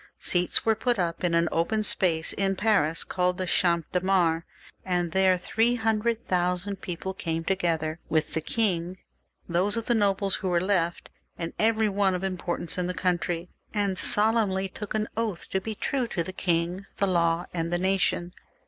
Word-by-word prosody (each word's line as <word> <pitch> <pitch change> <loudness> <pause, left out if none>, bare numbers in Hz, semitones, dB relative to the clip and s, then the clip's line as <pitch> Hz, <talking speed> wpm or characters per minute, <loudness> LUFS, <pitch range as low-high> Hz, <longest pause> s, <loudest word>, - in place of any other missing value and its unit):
Seats 180 0 +2
were 225 - +4
put 240 +2 0
up 170 -1 -2
in 170 -1 +2
an 170 0 +3
open 215 +7 0
space 165 -5 +3
in 195 -1 0
Paris, 185 -7 +2
called 180 -1 0
the 185 - -2
Champ 170 -2 +2
de 180 - +1
Mars, 175 -4 +2 0.4
and 175 -2 -1
there 190 0 +3
three 225 +6 +1
hundred 225 0 0
thousand 180 +2 -1
people 185 +2 -5
came 165 -3 -3
together 165 -4 -1
with 155 -1 0
the 160 - -1
king, 185 -3 -1 0.5
those 185 +5 +1
of 230 - -2
the 240 - +2
nobles 200 -3 +2
who 190 - -3
were 175 -1 +2
left, 180 -2 0 0.3
and 165 0 -4
every 220 0 +3
one 195 -2 +1
of 180 - -4
importance 180 -2 -3
in 180 - 0
the 180 - -3
country, 175 -1 -1 0.3
and 200 -2 +1
solemnly 210 -3 +2
took 210 +2 -6
an 215 0 0
oath 220 -6 -2
to 190 - 0
be 220 +2 -4
true 255 +3 -1
to 170 - -2
the 185 - -7
king, 175 +1 -1
the 200 - +2
law, 170 -2 +1
and 165 -1 -2
the 175 - +2
nation. 180 -1 +1
185 Hz, 185 wpm, -26 LUFS, 170-205 Hz, 0.5 s, were